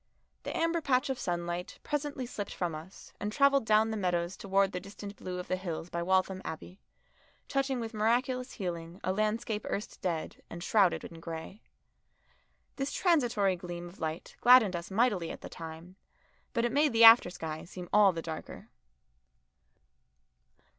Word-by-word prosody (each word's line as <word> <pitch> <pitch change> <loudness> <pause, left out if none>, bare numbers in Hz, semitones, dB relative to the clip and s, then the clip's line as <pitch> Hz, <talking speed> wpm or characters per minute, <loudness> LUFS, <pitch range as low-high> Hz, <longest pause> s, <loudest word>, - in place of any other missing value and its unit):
The - - -4
amber 330 0 +1
patch 265 -1 +1
of 260 - -4
sunlight 175 0 -3
presently 290 -3 -2
slipped 210 -4 -6
from 175 -3 -2
us 160 +5 -10
and 210 - -2
travelled 275 -1 +3
down 215 +1 +4
the - - -2
meadows 180 -2 -1
towards 195 0 +1
the 180 - -2
distant 200 +1 -9
blue 180 -2 -6
of 180 - -6
the 185 - 0
hills 175 -2 -5
by 170 - -2
Waltham 190 +1 +1
Abbey, 175 +4 -7 0.7
touching 270 -2 0
with 225 0 -5
miraculous 250 +4 0
healing 170 -2 -5
a 185 - 0
landscape 215 +1 -1
erst 205 - -4
dead 170 -4 -3
and 170 0 -7
shrouded 195 -4 +3
in 165 - -9
grey. 165 +5 -7 1.2
This 275 +1 -2
transitory 240 - +2
gleam 175 -1 -7
of 175 - -14
light 160 0 -4
gladdened 240 -7 +7
us 170 0 -5
mightily 200 -5 +1
at - - -7
the - - -8
time, 165 +3 -9 0.6
but 235 -1 +1
it 240 - 0
made 290 0 +3
the 230 0 +5
after 225 -4 +10
sky 160 -3 -6
seem 180 0 -9
all 210 -2 +7
the 165 -2 -5
darker. 160 -1 -7
195 Hz, 165 wpm, -31 LUFS, 175-235 Hz, 1.2 s, after